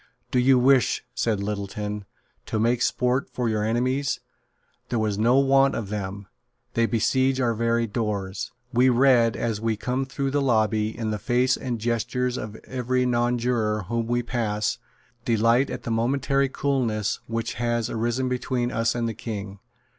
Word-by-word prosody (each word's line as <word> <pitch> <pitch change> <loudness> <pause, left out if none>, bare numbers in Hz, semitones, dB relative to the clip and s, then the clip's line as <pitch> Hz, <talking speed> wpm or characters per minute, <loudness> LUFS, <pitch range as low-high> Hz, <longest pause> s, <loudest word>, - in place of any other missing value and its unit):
"Do 125 - +2
you 130 +1 +5
wish," 130 0 +3
said 105 -4 0
Littleton, 105 0 -4 0.4
"to - - -2
make 120 +2 +2
sport 125 +8 +1
for 125 -2 -2
your 110 -1 0
enemies? 130 +5 0 0.7
There 115 -3 0
is 105 -1 -1
no 120 +4 +4
want 135 0 +4
of 105 -4 -4
them. 100 -1 -4 0.5
They 115 0 +2
besiege 130 +4 +1
our 120 -2 +2
very 115 +1 +1
doors. 100 -4 -3 0.2
We 125 +2 +5
read, 120 -2 +4
as 110 -3 -2
we 115 -1 0
come 130 +4 -1
through 135 +1 -2
the 145 +1 +1
lobby, 110 -4 +1
in 110 -2 -2
the 105 - -2
face 125 +3 +2
and 125 -3 -3
gestures 120 +2 -1
of 110 -3 -5
every 125 0 -1
nonjuror 120 -3 0
whom 115 -1 -1
we 120 +1 0
pass, 110 -4 -1 0.4
delight 115 +3 +3
at - - -5
the 115 - -3
momentary 135 +4 +1
coolness 120 -7 -1
which 115 0 -2
has 120 -1 0
arisen 120 +3 -1
between 125 -1 -1
us 115 0 0
and 120 -1 -1
the 115 - -2
King. 100 -3 -6
120 Hz, 160 wpm, -25 LUFS, 110-125 Hz, 0.7 s, you